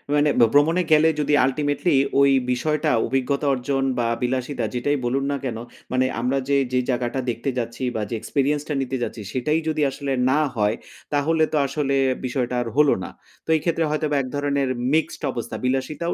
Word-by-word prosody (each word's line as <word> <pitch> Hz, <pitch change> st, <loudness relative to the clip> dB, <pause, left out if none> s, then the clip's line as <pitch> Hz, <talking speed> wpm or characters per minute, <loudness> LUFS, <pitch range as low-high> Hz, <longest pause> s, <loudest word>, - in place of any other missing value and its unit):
মানে 145 Hz, 0 st, +3 dB, 0.2 s
ভ্রমণে 160 Hz, +5 st, +4 dB
গেলে 155 Hz, +1 st, +6 dB
যদি 150 Hz, 0 st, +1 dB
ultimately 145 Hz, +4 st, 0 dB, 0.3 s
ওই 140 Hz, -, +6 dB, 0.2 s
বিষয়টা 150 Hz, +4 st, 0 dB, 0.2 s
অভিজ্ঞতা 135 Hz, +3 st, 0 dB
অর্জন 135 Hz, +1 st, -1 dB, 0.2 s
বা 120 Hz, -, +1 dB
বিলাসিতা 125 Hz, 0 st, -1 dB
যেটাই 145 Hz, +4 st, 0 dB
বলুন 135 Hz, +3 st, 0 dB
না 140 Hz, -, -1 dB
কেন, 120 Hz, -4 st, -3 dB, 0.3 s
মানে 130 Hz, 0 st, +2 dB, 0.2 s
আমরা 125 Hz, +3 st, 0 dB
যে, 140 Hz, -, +4 dB, 0.2 s
যে 125 Hz, -, +3 dB
জায়গাটা 125 Hz, 0 st, -1 dB
দেখতে 120 Hz, +4 st, -2 dB
যাচ্ছি 115 Hz, +1 st, -4 dB
বা 110 Hz, -, -1 dB
যে 115 Hz, -, -2 dB
experience 145 Hz, +1 st, 0 dB
টা 150 Hz, -, -2 dB
নিতে 135 Hz, 0 st, -2 dB
যাচ্ছি 110 Hz, -, -5 dB
সেটাই 150 Hz, +5 st, +1 dB
যদি 155 Hz, -, -1 dB
আসলে 140 Hz, 0 st, -4 dB, 0.2 s
না 140 Hz, +3 st, +3 dB, 0.2 s
হয়, 105 Hz, 0 st, +1 dB, 0.4 s
তাহলে 155 Hz, +2 st, +2 dB
তো -, -, +3 dB
আসলে 140 Hz, -1 st, -1 dB, 0.3 s
বিষয়টা 125 Hz, -1 st, -2 dB
আর 120 Hz, -, -3 dB
হলো 150 Hz, -2 st, +5 dB
না। -, -, -6 dB, 0.4 s
তো -, -, -13 dB
এই 155 Hz, -, 0 dB
ক্ষেত্রে 165 Hz, -1 st, +1 dB
হয়তোবা 150 Hz, -1 st, 0 dB
এক 130 Hz, -, -2 dB
ধরনের 140 Hz, -2 st, 0 dB, 0.2 s
মিক্সড 160 Hz, 0 st, 0 dB
অবস্থা। 120 Hz, -1 st, -5 dB
বিলাসিতাও 135 Hz, +6 st, -1 dB
140 Hz, 180 wpm, -23 LUFS, 125-150 Hz, 0.4 s, গেলে